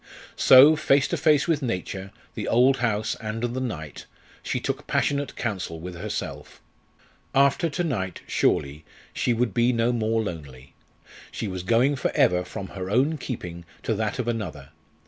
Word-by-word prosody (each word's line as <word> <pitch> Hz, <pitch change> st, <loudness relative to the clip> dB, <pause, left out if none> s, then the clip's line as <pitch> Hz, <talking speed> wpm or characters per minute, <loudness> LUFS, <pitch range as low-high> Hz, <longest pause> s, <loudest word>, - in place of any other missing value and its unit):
So, 140 Hz, +4 st, +8 dB
face 140 Hz, -2 st, +3 dB
to -, -, 0 dB
face 150 Hz, -2 st, +3 dB
with 160 Hz, -3 st, +1 dB
Nature, 95 Hz, -4 st, -4 dB, 0.2 s
the -, -, -5 dB
old 130 Hz, +3 st, +4 dB
house, 110 Hz, -3 st, 0 dB
and 110 Hz, +1 st, -4 dB
the 120 Hz, +2 st, -2 dB
night, 80 Hz, -, -6 dB, 0.3 s
she -, -, -2 dB
took -, -, -4 dB
passionate 145 Hz, -1 st, 0 dB
counsel 95 Hz, -8 st, -4 dB
with 90 Hz, +2 st, -7 dB
herself. 85 Hz, -, -6 dB, 0.8 s
After 140 Hz, +4 st, +3 dB
to 165 Hz, +4 st, -2 dB
night 95 Hz, -, -3 dB
surely, 70 Hz, +3 st, 0 dB, 0.3 s
she 125 Hz, -, 0 dB
would 115 Hz, -3 st, 0 dB
be 120 Hz, +1 st, +3 dB
no 115 Hz, 0 st, +1 dB
more 115 Hz, -1 st, 0 dB
lonely! 70 Hz, -9 st, -8 dB, 0.6 s
She 110 Hz, -, -4 dB
was 95 Hz, -2 st, -4 dB
going 120 Hz, +9 st, +2 dB
for -, -, 0 dB
ever 90 Hz, 0 st, +3 dB
from 95 Hz, +1 st, -7 dB
her 95 Hz, -1 st, -6 dB
own 140 Hz, +8 st, +2 dB
keeping 90 Hz, -10 st, -6 dB, 0.2 s
to 115 Hz, -, 0 dB
that 110 Hz, 0 st, -2 dB
of 125 Hz, -2 st, -3 dB
another. 100 Hz, -12 st, -4 dB
115 Hz, 165 wpm, -25 LUFS, 95-130 Hz, 0.8 s, So